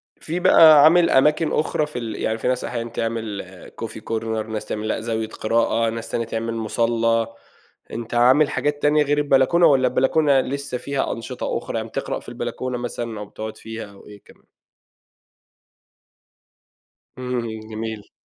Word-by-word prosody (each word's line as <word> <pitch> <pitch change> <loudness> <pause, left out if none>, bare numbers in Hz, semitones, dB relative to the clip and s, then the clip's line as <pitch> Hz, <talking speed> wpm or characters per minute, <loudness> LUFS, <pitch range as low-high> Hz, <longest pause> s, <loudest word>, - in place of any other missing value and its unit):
في 165 +3 -4
بقى 160 -5 +8
عامل 170 +2 +6
أماكن 150 +4 +3
أخرى 155 0 0
في 150 -4 -6
ال 115 -3 -5
يعني 110 +2 -2
في 115 - -3
ناس 125 0 0
أحيانًا 120 -1 -4
تعمل 115 -3 -3 0.4
Coffee - - -6
Corner 115 -1 -1
ناس 110 -1 -3
تعمل 110 0 -4
لأ، 110 - -2
زاوية 110 -1 -2
قراءة، 115 +1 0
ناس 115 0 -6
تانية 115 - -2
تعمل 115 0 -3
مُصلّى، 115 0 0 0.6
أنت 115 0 -6
عامل 130 +5 +5
حاجات 145 0 -1
تانية 150 +1 +4
غير 145 0 0
البلكونة، 145 +4 +4
والّا 130 -3 +4
البلكونة 135 +3 +3
لسه 140 -1 -4
فيها 140 +2 -2
أنشطة 115 - -4
أُخرى، - - -4
يعني - - -4
بتقرأ - - -3
في - - -12
البلكونة 130 -1 -4
مثلًا 120 -2 -5
أو 105 - -6
بتقعد 110 +1 -8
فيها 110 0 -7
أو 100 - -17
إيه 105 -1 -13
كمان؟ - - -21 2.7
إمم، 125 -1 -2
إمم، 110 -2 -5
جميل. 110 -1 -6
120 Hz, 160 wpm, -22 LUFS, 110-140 Hz, 2.7 s, بقى